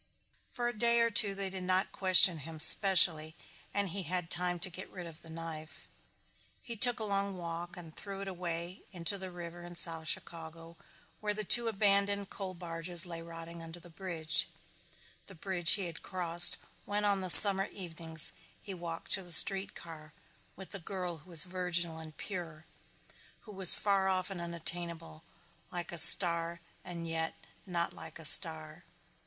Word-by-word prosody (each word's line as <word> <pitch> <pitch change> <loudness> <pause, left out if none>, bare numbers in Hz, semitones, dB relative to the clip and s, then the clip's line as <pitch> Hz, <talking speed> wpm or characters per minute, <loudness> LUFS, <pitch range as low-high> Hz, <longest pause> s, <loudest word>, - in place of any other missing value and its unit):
For 240 -2 -5
a 240 - -6
day 235 +2 +1
or 230 0 -1
two 205 -2 +2
they 195 -1 -3
did 190 -1 -9
not 185 +2 -2
question 185 -3 +2
him 160 +3 -12
specially 160 -2 +4 0.4
and 200 -1 -2
he 195 +3 -3
had 180 -1 -6
time 180 0 -1
to 185 - -2
get 185 +2 -11
rid 180 -2 -11
of 165 0 -14
the 165 - -15
knife. 160 -1 -11 0.8
He 235 - -8
took 245 +2 +4
a - - -6
long 200 -2 -5
walk 170 +1 -9
and 165 -3 -14
threw 195 -1 -10
it 200 - -9
away 175 -1 -8
into 185 +2 -2
the 190 0 -9
river 175 -1 -12
in 175 0 -13
South 165 -2 -2
Chicago 165 +1 -7 0.4
where 210 -1 -5
the 215 - -5
two 235 +4 +1
abandoned 200 -1 -1
coal 190 -2 -8
barges 170 0 -2
lay 170 -2 -9
rotting 165 0 -12
under 165 +1 -11
the 175 0 -17
bridge, 165 -3 -3 0.8
the 195 - -15
bridge 175 -2 +1
he 195 -2 -3
had 165 -2 -10
crossed 175 -2 +1 0.3
when 205 +1 -4
on 200 -1 -2
the 185 - -7
summer 195 +1 +8
evenings 165 -4 -1 0.3
he 195 - -11
walked 170 -2 -10
to 195 - 0
the 175 -2 -5
street 195 +3 +3
car 155 -2 -13 0.4
with 190 0 -14
the 200 - -9
girl 180 -2 -8
who 155 - -23
was 165 -3 +7
virginal 175 -2 -5
and 155 -1 -13
pure, 165 -5 -9 0.8
who 215 - -15
was 190 -3 +8
far 195 -2 -2
off 185 0 -4
and 180 -3 -8
unattainable, 170 -1 -6 0.5
like 175 -2 -8
a 170 - -2
star 170 0 +7 0.2
and 170 -2 -9
yet 160 0 -4 0.3
not 170 -2 -4
like - - -13
a 160 - -6
star. 155 +1 +6
175 Hz, 175 wpm, -29 LUFS, 165-195 Hz, 0.8 s, summer